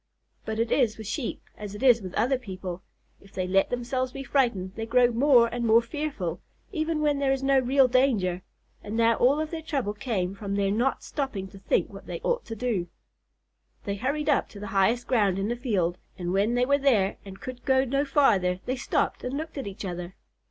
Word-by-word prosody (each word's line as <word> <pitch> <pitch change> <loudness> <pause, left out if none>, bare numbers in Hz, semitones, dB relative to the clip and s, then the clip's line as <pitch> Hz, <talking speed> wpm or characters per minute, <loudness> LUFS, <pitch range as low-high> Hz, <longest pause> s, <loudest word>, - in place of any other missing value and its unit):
But 220 0 -3
it 230 0 0
is 235 -6 +2
with 220 - -8
Sheep 235 +4 -4
as 210 -1 -7
it 205 - -7
is 245 -3 +6
with 185 -2 -7
other 250 +4 +2
people, 185 -5 -6 0.4
if 195 - -19
they 185 - -2
let 195 +1 +2
themselves 250 +1 -2
be 275 - -6
frightened 235 -10 0
they 225 +1 -5
grow 245 +1 +4
more 245 0 +5
and 240 +1 -3
more 230 0 +6
fearful, 235 - -4 0.3
even 315 -3 -1
when 295 -2 +2
there 275 -1 +2
is 270 0 -1
no 270 0 +4
real 265 +1 +4
danger 230 -9 +2 0.4
and 210 +2 -4
now 230 0 +4
all 270 +5 +4
of 310 0 -3
their 330 -1 -4
trouble 275 -9 -2
came 205 -5 -2
from 200 0 -4
their 200 -1 +1
not 240 +6 0
stopping 265 -10 -3
to 195 - -13
think - - 0
what - - -11
they - - -5
ought - - -1
to 225 - -6
do. 220 -7 -1 1.0
They 200 - -2
hurried 285 +6 -2
up 290 - +2
to 205 - -11
the 205 - -6
highest 220 +5 +2
ground 205 -7 +2
in 195 +2 -1
the 240 - 0
field, 190 -8 -1 0.2
and 175 -1 -3
when 205 +5 +2
they 245 0 +3
were 280 +2 +3
there 225 -9 +2
and 195 -1 -10
could 255 -1 -8
go 265 -1 +3
no 275 +2 +1
farther, 210 -11 +3
they 255 +1 -2
stopped 250 - -1
and 250 +2 -3
looked 315 -1 -5
at 265 - -5
each 195 0 -6
other. 180 0 -5
235 Hz, 220 wpm, -27 LUFS, 195-270 Hz, 1.0 s, is